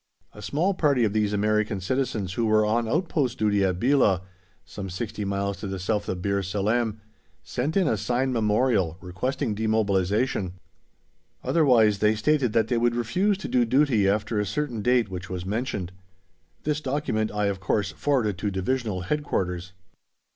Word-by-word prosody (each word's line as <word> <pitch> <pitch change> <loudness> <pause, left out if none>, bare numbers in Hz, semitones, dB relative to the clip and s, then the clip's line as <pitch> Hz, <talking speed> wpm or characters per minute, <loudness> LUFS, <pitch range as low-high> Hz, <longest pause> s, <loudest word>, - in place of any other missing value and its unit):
A 105 - -11
small 155 - 0
party 145 -8 +2
of 105 -2 +1
these 105 -1 +1
American 105 0 +1
citizens 105 -3 -2
who 115 +2 0
were 110 0 +4
on 115 +1 0
outpost 150 -4 0
duty 105 -2 +2
at 90 -2 0
Belah, 120 -7 +3 0.4
some 95 -1 -7
sixty 105 +3 -4
miles 100 0 -2
to 100 - -6
the 95 0 -4
south 100 +3 -2
of 90 -1 -3
Bir 100 0 +1
Salem, 105 +3 -1 0.4
sent 145 +9 -2
in 190 -4 +3
a 110 - +1
signed 125 +5 0
memorial 105 -6 +1
requesting 95 +6 -2
demobilization; 105 -1 0 0.9
otherwise 115 -10 +4
they 105 +1 +3
stated 130 +2 +1
that 115 -2 +2
they 120 -1 +1
would 120 0 +2
refuse 185 - +1
to 200 - -6
do 125 - +2
duty 120 -5 +3
after 105 +2 0
a 105 - 0
certain 145 -7 -2
date 125 +1 +3
which 95 -1 -7
was 90 -1 -5
mentioned. 105 -3 -3 0.7
This 150 0 -1
document 130 -6 -1
I, 105 0 -1
of 100 -1 -1
course, 95 +1 0
forwarded 115 -10 0
to 105 - -1
Divisional 100 0 -2
Headquarters. 90 - -2
110 Hz, 165 wpm, -25 LUFS, 100-125 Hz, 0.9 s, were